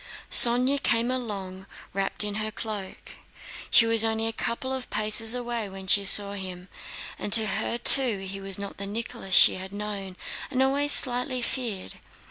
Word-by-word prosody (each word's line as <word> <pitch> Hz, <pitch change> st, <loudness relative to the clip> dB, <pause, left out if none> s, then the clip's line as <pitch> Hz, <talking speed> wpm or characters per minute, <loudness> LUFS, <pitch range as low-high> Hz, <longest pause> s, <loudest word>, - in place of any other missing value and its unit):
Sónya 250 Hz, +4 st, +6 dB
came 235 Hz, +1 st, 0 dB
along, 195 Hz, -6 st, -6 dB, 0.3 s
wrapped 195 Hz, +2 st, -2 dB
in 210 Hz, -1 st, -3 dB
her 215 Hz, -, -4 dB
cloak. 210 Hz, -3 st, -9 dB, 0.5 s
She 230 Hz, -, +4 dB
was 225 Hz, -1 st, +2 dB
only 225 Hz, 0 st, -1 dB
a 225 Hz, -, -3 dB
couple 245 Hz, +4 st, -4 dB
of 260 Hz, -1 st, -6 dB
paces 220 Hz, +2 st, 0 dB
away 240 Hz, -4 st, -5 dB
when 190 Hz, 0 st, -10 dB
she 200 Hz, +1 st, +2 dB
saw 200 Hz, +1 st, +5 dB
him, 185 Hz, -2 st, -9 dB, 0.5 s
and 205 Hz, -, -4 dB
to 220 Hz, -1 st, +6 dB
her 215 Hz, +3 st, -3 dB
too 245 Hz, -2 st, +6 dB
he 195 Hz, +1 st, -8 dB
was 195 Hz, -1 st, -3 dB
not 200 Hz, 0 st, -8 dB
the 200 Hz, -, -5 dB
Nicholas 205 Hz, -3 st, -4 dB
she -, -, +5 dB
had 190 Hz, +1 st, -8 dB
known 200 Hz, -2 st, -7 dB, 0.3 s
and 260 Hz, -1 st, 0 dB
always 285 Hz, +2 st, 0 dB
slightly 250 Hz, -1 st, +1 dB
feared. 235 Hz, -7 st, -5 dB
215 Hz, 170 wpm, -25 LUFS, 195-240 Hz, 0.5 s, Sónya